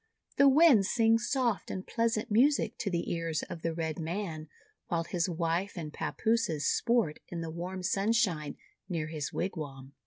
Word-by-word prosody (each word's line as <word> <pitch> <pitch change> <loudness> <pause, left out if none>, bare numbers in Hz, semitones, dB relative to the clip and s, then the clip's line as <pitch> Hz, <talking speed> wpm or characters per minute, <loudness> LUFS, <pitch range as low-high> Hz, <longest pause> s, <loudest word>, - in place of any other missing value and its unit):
The 280 0 +7
winds 270 - +6
sing 225 -1 +4
soft 240 -2 0
and 185 - -5
pleasant 230 -1 -1
music 270 +7 +3
to 205 - -1
the 170 -2 -1
ears 165 -2 -2
of 165 - -7
the 165 - -1
Red 160 0 -3
Man, 165 -2 -4 0.4
while 170 -1 0
his 170 +1 -1
wife 170 +3 -1
and 155 -3 -5
papooses 220 -10 0
sport 230 -10 +1
in 170 -1 -5
the 165 -1 -4
warm 180 +3 -5
sunshine 195 -5 +1 0.3
near 160 -4 -2
his 155 -3 -4
wigwam." 140 -7 -5
175 Hz, 160 wpm, -30 LUFS, 160-225 Hz, 0.4 s, The